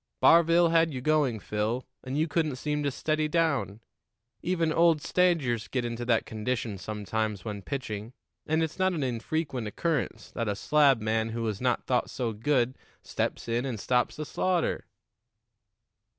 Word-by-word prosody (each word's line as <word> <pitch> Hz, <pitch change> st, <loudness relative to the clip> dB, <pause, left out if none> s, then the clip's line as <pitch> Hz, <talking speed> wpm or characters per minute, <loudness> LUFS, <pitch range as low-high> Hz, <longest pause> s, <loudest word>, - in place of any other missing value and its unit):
Barville 170 Hz, +1 st, +6 dB
had 165 Hz, -1 st, +3 dB
you 130 Hz, -, -4 dB
going, 140 Hz, -4 st, +2 dB
Phil, 105 Hz, +5 st, -2 dB, 0.2 s
and 130 Hz, +2 st, -3 dB
you 155 Hz, +2 st, +2 dB
couldn't 155 Hz, -2 st, 0 dB
seem 150 Hz, +3 st, -2 dB
to 145 Hz, -, +1 dB
steady 155 Hz, +3 st, 0 dB
down. 140 Hz, -, 0 dB, 0.6 s
Even 170 Hz, -3 st, 0 dB
old 165 Hz, -2 st, +4 dB
stagers 145 Hz, -, +1 dB
get 125 Hz, +1 st, -2 dB
into 120 Hz, 0 st, -4 dB
that 115 Hz, -2 st, +2 dB
condition 110 Hz, -2 st, -3 dB
sometimes 105 Hz, -1 st, -3 dB
when 105 Hz, -2 st, -4 dB
pitching, 110 Hz, -3 st, -5 dB, 0.4 s
and 160 Hz, +1 st, +2 dB
it's 160 Hz, +3 st, -4 dB
not 185 Hz, 0 st, +3 dB
an 155 Hz, -5 st, -1 dB
infrequent 130 Hz, 0 st, -2 dB
occurrence 130 Hz, -3 st, -2 dB
that 115 Hz, -, -3 dB
a 100 Hz, -, 0 dB
slabman 115 Hz, -5 st, +2 dB
who 115 Hz, -1 st, -2 dB
is 105 Hz, -3 st, -3 dB
not 125 Hz, -2 st, 0 dB
thought 125 Hz, -2 st, +1 dB
so 120 Hz, -3 st, -2 dB
good 125 Hz, +2 st, 0 dB, 0.2 s
steps -, -, -3 dB
in 120 Hz, +1 st, 0 dB
and 125 Hz, -5 st, -3 dB
stops 125 Hz, +4 st, +1 dB
the 155 Hz, -, -5 dB
slaughter." 175 Hz, -, 0 dB
130 Hz, 160 wpm, -28 LUFS, 110-155 Hz, 0.6 s, Barville